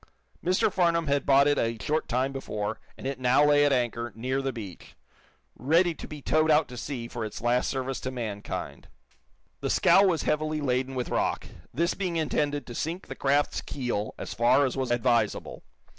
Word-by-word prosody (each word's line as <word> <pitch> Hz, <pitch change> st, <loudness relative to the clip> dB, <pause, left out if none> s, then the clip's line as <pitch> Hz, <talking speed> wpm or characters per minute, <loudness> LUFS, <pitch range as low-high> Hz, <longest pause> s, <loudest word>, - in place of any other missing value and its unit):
Mr. 185 Hz, +3 st, +2 dB
Farnum 170 Hz, -3 st, +2 dB
had 140 Hz, -1 st, 0 dB
bought 140 Hz, +1 st, +6 dB
it 145 Hz, -, +2 dB
a 115 Hz, 0 st, 0 dB
short 155 Hz, +8 st, -1 dB
time 130 Hz, +3 st, 0 dB
before 110 Hz, -5 st, -4 dB, 0.2 s
and -, -, -10 dB
it 135 Hz, -1 st, -3 dB
now 130 Hz, +3 st, +4 dB
lay 145 Hz, 0 st, +5 dB
at 145 Hz, -, +3 dB
anchor, 120 Hz, -2 st, -1 dB
near 130 Hz, +4 st, -1 dB
the 135 Hz, 0 st, -1 dB
beach, 100 Hz, -8 st, -9 dB, 0.6 s
ready 165 Hz, -, +2 dB
to -, -, -9 dB
be 150 Hz, -2 st, -9 dB
towed 155 Hz, 0 st, +2 dB
out 155 Hz, 0 st, +4 dB
to 125 Hz, -, -8 dB
sea 120 Hz, -1 st, -5 dB
for 120 Hz, -1 st, -5 dB
its 110 Hz, -, -6 dB
last 120 Hz, +2 st, +1 dB
service 130 Hz, 0 st, -3 dB
to 130 Hz, -, -4 dB
mankind. 110 Hz, -5 st, -5 dB, 0.7 s
The -, -, -3 dB
scow 195 Hz, -, +5 dB
was 180 Hz, -5 st, +2 dB
heavily 155 Hz, 0 st, 0 dB
laden 130 Hz, -1 st, -1 dB
with 125 Hz, -1 st, -3 dB
rock, -, -, -1 dB, 0.3 s
this 170 Hz, +7 st, 0 dB
being 185 Hz, -3 st, -3 dB
intended 145 Hz, -3 st, -1 dB
to 120 Hz, -, -8 dB
sink 165 Hz, +9 st, -3 dB
the -, -, -5 dB
craft's 140 Hz, +1 st, +1 dB
keel 120 Hz, -6 st, -3 dB
as -, -, -6 dB
far 120 Hz, +7 st, +4 dB
as 130 Hz, -, -2 dB
was 130 Hz, -2 st, -2 dB
advisable. 120 Hz, -2 st, 0 dB
135 Hz, 190 wpm, -27 LUFS, 120-150 Hz, 0.7 s, bought